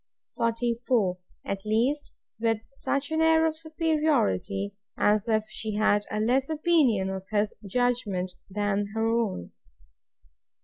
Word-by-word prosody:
44. 230 -4 0 0.3
At 195 0 -3
least, 245 +8 0 0.3
with 225 -1 +2 0.2
such 280 +2 -2
an 320 0 +1
air 320 0 +5
of 315 0 -1
superiority, 300 - 0 0.2
as 210 +2 +2
if 215 -1 +2
she 215 -2 -3
had 205 -1 +3
a 210 - -2
less 255 +6 +2
opinion 295 - +2
of 190 0 -6
his 210 0 +1
judgment 205 -5 0 0.2
than 205 0 0
her 225 0 +1
own. 225 - -1
225 Hz, 125 wpm, -27 LUFS, 205-275 Hz, 0.3 s, air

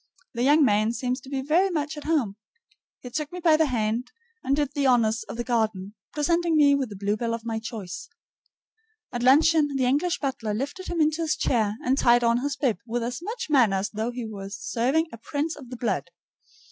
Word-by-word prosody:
The 235 - -3
young 290 +3 +5
man 215 0 +2
seems 250 +2 -2
to 265 - -12
be 270 -1 -2
very 340 +7 +3
much 310 -3 -2
at 295 - -9
home. 285 -11 0 0.7
He 250 - -9
took 300 +2 -3
me 360 - -6
by 330 -3 +5
the 315 0 +3
hand, 230 -1 -1 0.3
and 270 +1 +1
did 290 -2 -1
the 280 -2 +1
honors 230 -3 +3
of - - -6
the 240 - -2
garden, 220 -5 -1 0.2
presenting 335 +2 +1
me 290 -2 +6
with 275 -4 0
the 205 - -8
bluebell 210 +4 -1
of 230 0 -10
my 225 -1 -2
choice. 220 -5 -7 1.0
At 240 - -3
luncheon 290 +3 +4
the 260 -1 +1
English 295 +8 +1
butler 255 -7 -3
lifted 285 - -4
him 340 -2 -1
into 310 +2 +2
his 310 -2 +1
chair 220 -8 0
and 265 +2 +2
tied 240 0 +4
on 235 0 +3
his 280 +2 -2
bib 265 -6 0
with 235 +1 -2
as 245 +5 -4
much 440 +7 -5
manner 235 -9 +4
as 195 +1 -2
though 220 +2 -2
he 245 -1 -5
were 200 -3 -7
serving 245 +9 0
a - - -7
prince 290 +7 -3
of 265 -5 -12
the 250 - -7
blood. 235 - -2
255 Hz, 215 wpm, -25 LUFS, 230-300 Hz, 1.0 s, me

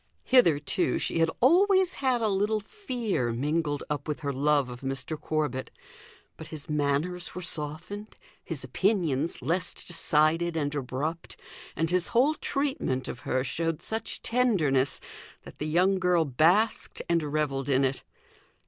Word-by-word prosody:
Hitherto 160 - +3
she - - -1
had 165 0 +3
always 375 +6 +4
had 255 -3 +1
a 220 - +2
little 210 +2 +1
fear 225 - -3
mingled 145 +4 -1
up 145 0 -4
with 150 0 -3
her 140 -2 -2
love 145 0 +2
of 125 0 -9
Mr. 135 +3 -3
Corbet; 150 -4 -2 0.7
but 160 - -9
his 155 -2 -8
manners 150 +4 -1
were 180 - -5
softened, 170 +7 0 0.3
his 150 -6 -5
opinions 160 - 0
less 175 +7 0
decided 165 0 +1
and 145 -2 -1
abrupt, 145 +4 -4 0.4
and 165 +1 -1
his 180 -1 +1
whole 265 +6 +3
treatment 275 - -2
of 120 - -6
her 130 0 +1
showed 165 +4 -2
such 220 +1 -3
tenderness, 165 - +2 0.4
that - - -13
the 150 - -2
young 185 +5 +2
girl 180 -3 +2
basked 170 - +2
and 170 -1 +2
revelled 145 -2 -2
in 135 0 +3
it. 135 +1 -2
160 Hz, 145 wpm, -27 LUFS, 145-195 Hz, 0.7 s, always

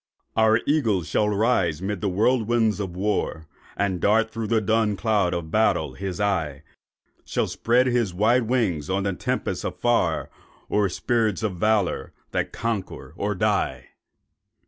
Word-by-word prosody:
Our 110 +1 +4
Eagle 115 - +2
shall 105 +7 +1
rise 100 -7 +1
'mid 95 0 -3
the 100 - 0
whirlwinds 110 +1 +2
of 95 -4 -4
war, 95 -4 -1 0.3
And 95 -3 -1
dart 110 +2 +3
through 115 -1 -4
the 115 0 +2
dun 110 0 +1
cloud 105 -5 +1
of 80 -2 -5
battle 110 +1 +2
his 95 -2 -5
eye— 80 -9 -1 0.6
Shall - - -1
spread 120 +2 +2
his 120 -6 +1
wide 110 +6 +2
wings 95 - 0
on 95 +1 0
the 100 -1 0
tempest - - -2
afar, - - 0 0.4
O'er 105 -1 +2
spirits 110 0 0
of 100 -5 -2
valour 105 -1 0 0.2
that - - -1
conquer 115 -5 -4
or - - -2
die. 65 -2 0
105 Hz, 145 wpm, -24 LUFS, 95-115 Hz, 0.6 s, Our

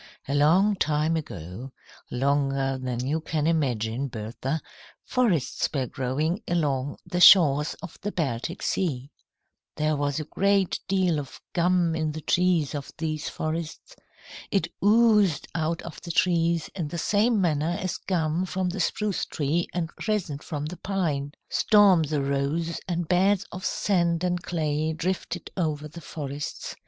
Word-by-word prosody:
"A 140 - -1
long 175 +9 +4
time 155 +1 +1
ago, 115 - -6 0.4
longer 135 0 0
than 125 -1 -3
you 155 +4 0
can 155 -1 -1
imagine, 130 -6 0
Bertha, 120 +6 -4 0.5
forests 215 - +1
were 135 -4 -1
growing 150 - -1
along 145 -5 0
the 180 - -2
shores 150 -6 +7
of 185 - -9
the 205 - -2
Baltic 155 - -3
Sea. 140 -7 -1 0.6
There 155 0 +1
was 145 +1 -1
a - - -2
great 195 +4 +1
deal 185 -5 +2
of 140 -2 -8
gum 175 -1 +2
in 155 -1 -1
the 155 - -6
trees 175 -3 +2
of 145 -2 -5
these 155 -2 -2
forests. 160 - -5 0.5
It 190 -5 0
oozed 210 -6 +4
out 160 +1 -1
of 170 - -9
the 170 - -9
trees 170 -1 +2
in 170 -6 -3
the 170 - -5
same 210 +6 +2
manner 165 -1 +1
as 185 -3 -2
gum 170 0 -1
from 185 0 -1
the 190 +3 -4
spruce 205 +3 0
tree 155 +4 -1
and 170 -2 -2 0.2
resin 185 -10 -1
from 150 -2 -5
the 175 +4 -6
pine. 155 -8 -2
"Storms 190 -8 +4
arose, 145 +3 -1
and 175 -2 -2
beds 190 +3 +3
of 185 +1 -7
sand 175 -5 +1
and 180 -1 0
clay 155 -2 -1
drifted 175 +1 -3
over 155 -4 -1
the 170 +3 -11
forests. 145 -2 -6
160 Hz, 145 wpm, -26 LUFS, 145-180 Hz, 0.6 s, shores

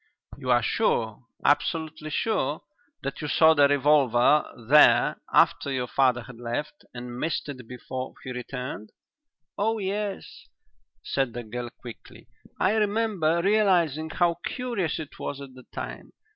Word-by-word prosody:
"You 130 - -7
are 120 -1 +4
sure, 115 - 0 0.2
absolutely 155 +1 0
sure, 155 -4 -1 0.4
that 135 - -4
you 150 - -3
saw 160 +2 +5
the 145 -2 +5
revolver 140 -1 +3 0.2
there 150 +3 +5
after 140 - +3
your 130 -2 -1
father 125 -1 +2
had 125 -1 -12
left, 145 +6 -5
and 120 0 -8
missed 160 +1 -2
it 130 -4 -8
before 130 +1 -6
he 130 - -6
returned?" 125 -4 -6 0.7
"Oh 220 +2 +1
yes," 200 0 -4 0.6
said 135 -4 -1
the 120 - -5
girl 120 +2 -6
quickly; 120 0 -13 0.3
"I 195 - +3
remember 205 -6 +1
realizing 180 -7 +2
how 170 0 +1
curious 235 -10 -2
it 155 -3 -8
was 140 - -4
at 140 -2 -10
the 130 -1 -15
time. - - -7
145 Hz, 140 wpm, -26 LUFS, 125-170 Hz, 0.7 s, saw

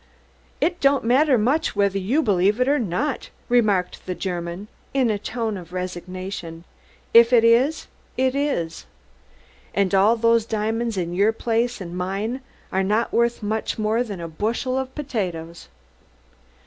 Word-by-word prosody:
"Id 350 0 +1
don'd 275 0 +3
madder 260 +3 +4
much 255 +8 +1
whedher 200 -1 +1
you 250 +12 +1
belief 200 0 +2
id 250 - +2
or 290 +1 +3
nod," 245 - -2 0.2
remarked 210 -7 +2
the 180 - -2
German 175 +1 -4 0.3
in 255 -4 +3
a 205 - -2
tone 225 -1 -3
of 175 -1 -11
resignation. 180 -2 -6 0.5
"If 235 +1 +8
id 235 -2 +5
iss, 245 +7 +3 0.3
id 260 0 +2
iss. 275 - -2 0.9
Und 200 -1 +1
all 205 +4 +4
dose 230 0 +3
diamonds 225 0 -1
in 175 -1 -2
your 200 +4 +3
place 235 +1 -1
und 175 -2 -7
mine 200 +8 -3 0.3
are 190 - +1
nod 210 +4 +1
worth 235 -1 +1
much 215 +1 -2
more 220 +2 +1
by 210 -5 -6
der 170 -2 -6
bushel 230 - -1
as 265 - -2
potatoes." 180 - -4
215 Hz, 150 wpm, -23 LUFS, 185-245 Hz, 0.9 s, If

